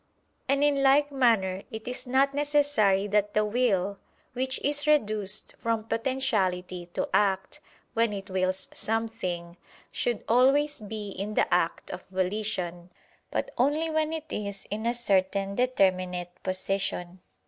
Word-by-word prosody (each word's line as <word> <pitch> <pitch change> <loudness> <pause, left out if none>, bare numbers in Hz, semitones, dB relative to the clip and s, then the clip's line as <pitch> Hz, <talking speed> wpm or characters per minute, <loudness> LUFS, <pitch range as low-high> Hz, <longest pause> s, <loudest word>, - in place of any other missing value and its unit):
] - - -42
And 280 +1 +3
in 285 -1 +3
like 285 +2 +4
manner 220 -8 +2
it 220 +1 -8
is 250 +1 -3
not 270 +2 +3
necessary 285 -9 +2
that 205 0 +1
the 215 0 +3
will 205 -4 +1 0.3
(which 260 +1 -1
is 290 +1 -1
reduced 215 -9 +2
from 230 -1 -1
potentiality 210 -8 -1
to - - 0
act, 195 -2 +1 0.3
when 230 -1 +2
it 195 -1 -6
wills 185 -1 -1
something), 185 -6 -3 0.3
should 240 -2 -1
always 270 +4 +3
be 210 0 -5
in 205 +2 -5
the - - +2
act 170 -1 0
of 180 0 -7
volition; 185 -2 -2 0.4
but - - -2
only 300 +5 +2
when 310 0 +1
it 320 -1 -5
is 200 -1 -4
in 215 +2 -2
a 240 - +1
certain 195 -3 +1
determinate 185 -7 +1
disposition. 185 -1 -2
215 Hz, 140 wpm, -27 LUFS, 190-260 Hz, 0.4 s, like